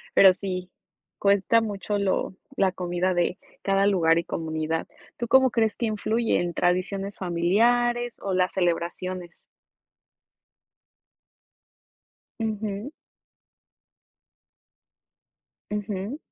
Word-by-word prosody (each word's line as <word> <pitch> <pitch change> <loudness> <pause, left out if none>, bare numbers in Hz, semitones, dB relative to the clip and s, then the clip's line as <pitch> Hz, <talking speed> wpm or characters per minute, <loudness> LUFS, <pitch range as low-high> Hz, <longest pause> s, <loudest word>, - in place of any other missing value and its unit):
Pero 190 -1 +8
sí, 185 -1 -5 0.5
cuesta 200 +3 +3
mucho 205 -1 -2
lo 190 -1 0 0.2
la 195 -1 +3
comida 180 0 -1
de 175 0 0 0.3
cada 195 0 +3
lugar 165 -4 +4
y 170 - +1
comunidad, 160 0 -2 0.3
¿tú 240 - -3
cómo 265 +1 +5
crees 220 -2 +1
que 235 - -1
influye 220 +2 0
en 175 -1 -2
tradiciones 195 +3 -1
familiares 235 +7 +1
o 195 - -2
las 185 0 +2
celebraciones? 175 0 -2 3.0
Ujú. 215 +2 -3 2.8
Ujú. 210 +5 -3
195 Hz, 90 wpm, -25 LUFS, 180-215 Hz, 3.0 s, Pero